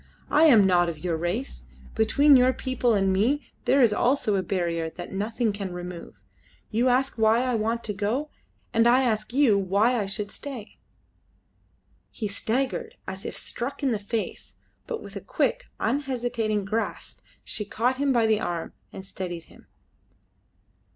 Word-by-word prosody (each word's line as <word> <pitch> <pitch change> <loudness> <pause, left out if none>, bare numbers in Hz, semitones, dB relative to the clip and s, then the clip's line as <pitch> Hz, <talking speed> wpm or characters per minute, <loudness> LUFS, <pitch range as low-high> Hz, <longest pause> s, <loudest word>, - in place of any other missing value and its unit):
I 310 +2 +6
am 235 -10 +7
not 175 -2 +3
of 165 - -5
your 165 +2 -2
race. 175 +11 -3 0.3
Between 275 +7 +5
your 255 0 +5
people 250 -4 0
and 195 -1 +2
me 245 +10 +1 0.2
there 270 0 +4
is 225 -3 +4
also 245 -3 +2
a 190 - +1
barrier 170 -3 -1
that 175 +2 -9
nothing 215 +3 -1
can 200 -2 -5
remove. 175 -1 -7 0.6
You 240 +3 +2
ask 255 0 +1
why 220 +2 +4
I 255 -1 0
want 230 +1 -1
to 210 - -3
go, 225 +10 -2 0.4
and 230 +1 +4
I 250 +2 +5
ask 215 -3 -1
you 245 -6 +4
why 205 +5 +2
I 200 - -3
should 205 +1 -3
stay." 255 -7 -8 1.3
He 215 - -4
staggered 235 +6 -2
as 190 0 -7
if - - -5
struck 265 +4 -4
in 270 - +2
the 220 - 0
face, 215 +2 -4 0.3
but 465 -2 -4
with - - -11
a - - -5
quick, - - -1
unhesitating 240 -6 -1
grasp 220 +3 -3 0.2
she 210 - -4
caught 235 +5 0
him 280 0 +1
by 235 -3 +3
the 220 -1 +3
arm 175 -4 -3 0.2
and 190 - -9
steadied 175 -3 -6
him. - - -19
220 Hz, 165 wpm, -26 LUFS, 195-255 Hz, 1.3 s, am